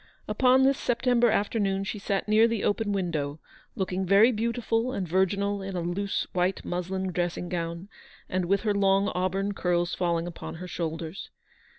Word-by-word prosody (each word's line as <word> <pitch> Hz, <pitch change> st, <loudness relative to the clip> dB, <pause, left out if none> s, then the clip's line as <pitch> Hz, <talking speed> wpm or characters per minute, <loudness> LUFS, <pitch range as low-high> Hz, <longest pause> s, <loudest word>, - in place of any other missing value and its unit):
Upon 255 Hz, +4 st, +4 dB
this 275 Hz, +1 st, +3 dB
September 245 Hz, 0 st, +2 dB
afternoon 200 Hz, -2 st, 0 dB
she 205 Hz, +2 st, -4 dB
sat 195 Hz, 0 st, -2 dB
near 215 Hz, +2 st, +5 dB
the 230 Hz, -3 st, -2 dB
open 205 Hz, 0 st, 0 dB
window, 160 Hz, -7 st, -2 dB, 0.4 s
looking 190 Hz, 0 st, -2 dB
very 200 Hz, +6 st, +6 dB
beautiful 230 Hz, +1 st, -1 dB
and 190 Hz, -7 st, -2 dB
virginal 195 Hz, +3 st, +1 dB
in 195 Hz, -1 st, -5 dB
a 175 Hz, -, -1 dB
loose 190 Hz, +4 st, -2 dB
white 180 Hz, +1 st, 0 dB
muslin 185 Hz, +1 st, -2 dB
dressing 175 Hz, 0 st, -2 dB
gown, 170 Hz, +1 st, -4 dB, 0.4 s
and 185 Hz, -1 st, -1 dB
with 195 Hz, +2 st, +2 dB
her 215 Hz, -2 st, +1 dB
long 195 Hz, 0 st, +3 dB
auburn 190 Hz, +2 st, -1 dB
curls 175 Hz, -2 st, 0 dB
falling 170 Hz, -2 st, 0 dB
upon 175 Hz, -1 st, -7 dB
her 180 Hz, +2 st, -7 dB
shoulders. 165 Hz, +2 st, -5 dB
195 Hz, 165 wpm, -27 LUFS, 175-210 Hz, 0.4 s, very